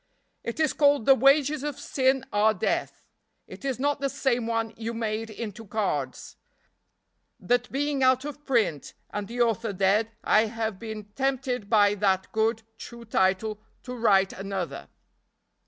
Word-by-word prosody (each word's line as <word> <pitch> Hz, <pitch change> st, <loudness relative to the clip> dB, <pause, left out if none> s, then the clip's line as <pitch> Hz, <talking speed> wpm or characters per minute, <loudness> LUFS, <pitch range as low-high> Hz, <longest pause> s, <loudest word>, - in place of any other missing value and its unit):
"It 235 Hz, -, -5 dB
is 310 Hz, -3 st, +2 dB
called 285 Hz, -5 st, +3 dB
'The 270 Hz, -, +8 dB
Wages 275 Hz, +3 st, +3 dB
of 295 Hz, -2 st, -4 dB
Sin 265 Hz, -1 st, +1 dB
are 215 Hz, +1 st, +3 dB
Death.' 180 Hz, -, -2 dB, 0.4 s
It -, -, -12 dB
is 270 Hz, -2 st, -1 dB
not 285 Hz, +2 st, 0 dB
the 275 Hz, 0 st, -1 dB
same 245 Hz, -4 st, 0 dB
one 225 Hz, -1 st, -1 dB
you 230 Hz, +1 st, -5 dB
made 225 Hz, 0 st, -3 dB
into 220 Hz, 0 st, -7 dB
cards; 190 Hz, -, -3 dB, 1.0 s
that 245 Hz, +5 st, 0 dB
being 285 Hz, 0 st, -1 dB
out 260 Hz, +1 st, +3 dB
of 295 Hz, 0 st, -7 dB
print 225 Hz, -, 0 dB, 0.2 s
and 205 Hz, -1 st, -4 dB
the 240 Hz, +3 st, -3 dB
author 225 Hz, -2 st, +1 dB
dead 200 Hz, +4 st, +2 dB
I 215 Hz, +1 st, +4 dB
have 220 Hz, -3 st, -3 dB
been 220 Hz, -2 st, -6 dB
tempted 260 Hz, -5 st, -1 dB
by 205 Hz, -2 st, +5 dB
that 190 Hz, -2 st, 0 dB
good, 225 Hz, +1 st, 0 dB, 0.2 s
true 235 Hz, -1 st, -10 dB
title 205 Hz, +1 st, +1 dB, 0.2 s
to 250 Hz, -1 st, -6 dB
write 195 Hz, -5 st, +3 dB
another. 195 Hz, -2 st, -5 dB
225 Hz, 155 wpm, -26 LUFS, 210-260 Hz, 1.0 s, The